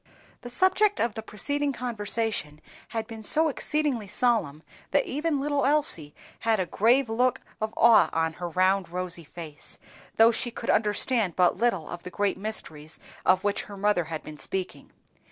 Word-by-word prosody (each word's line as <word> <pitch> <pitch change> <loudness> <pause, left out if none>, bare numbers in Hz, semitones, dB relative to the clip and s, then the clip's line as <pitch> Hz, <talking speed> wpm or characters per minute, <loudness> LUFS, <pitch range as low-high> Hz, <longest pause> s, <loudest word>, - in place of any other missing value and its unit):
THE 245 - -8
subject 375 - +3
of 230 -2 0
the 220 - -5
preceding 285 +7 -1
conversation 220 - -2 0.3
had 225 -1 -4
been 225 -2 -9
so 315 +9 +4
exceedingly 285 -6 -1
solemn 190 - 0 0.3
that 285 - +2
even 295 +1 -1
little 285 0 0
Elsie 270 - +1 0.2
had 225 -2 +1
a 185 - +1
grave 235 +9 +3
look 245 +3 +1 0.2
of 215 0 -1
awe 225 -8 +6
on 160 0 0
her 175 - -3
round 185 +1 +1
rosy 180 -1 -4
face, 155 -1 -9 0.4
though 225 +1 +7
she 240 +1 -1
could 235 - -2
understand 210 -2 +1
but 180 -1 +3
little 230 -10 +1
of 175 - -7
the 180 - -8
great 200 +1 -1
mysteries 160 -7 -4 0.3
of 185 - +4
which 205 0 -1
her 200 - -10
mother 200 -4 +1
had 160 0 -6
been 150 -1 -10
speaking. 190 -1 -5
215 Hz, 170 wpm, -26 LUFS, 175-250 Hz, 0.4 s, though